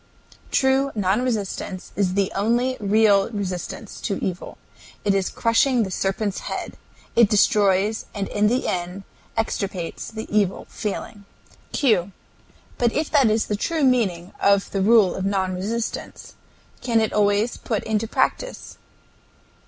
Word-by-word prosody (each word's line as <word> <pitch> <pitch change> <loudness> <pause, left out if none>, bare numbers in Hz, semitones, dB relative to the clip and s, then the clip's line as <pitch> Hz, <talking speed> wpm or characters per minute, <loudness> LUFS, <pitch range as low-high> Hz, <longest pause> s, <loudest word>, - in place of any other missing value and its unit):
True 270 +1 +2
non 205 +2 +1
resistance 205 -6 -3
is 190 -2 0
the 200 -1 +1
only 240 +5 +1
real 205 -1 +3
resistance 200 0 -5
to 200 - -1
evil. 185 -1 -4 0.5
It 200 - +3
is 195 -1 0
crushing 240 +1 +2
the 190 - -4
serpent's 195 +2 -1
head. - - -5 0.4
It 235 -3 +6
destroys 205 0 +3
and 200 -1 -2
in 210 0 +2
the 245 +4 +1
end 180 +2 -3 0.3
extirpates 195 -6 -3
the 220 0 -6
evil 200 -3 +1
feeling. 205 -1 -5 0.5
Q. 200 -9 +2 0.7
But 240 -2 +2
if 305 +1 -1
that 275 -6 +5
is 220 +1 +1
the 210 - -1
true 315 +9 -1
meaning 195 -9 +1
of 200 0 +3
the 195 - -1
rule 210 -2 +5
of 190 - -4
non 190 -1 0
resistance, 220 +5 -4 0.5
can 235 -2 +2
it 220 - 0
always 205 +2 +2
put 220 -4 -2
into 220 0 -1
practice? - - -2
210 Hz, 140 wpm, -23 LUFS, 195-230 Hz, 0.7 s, It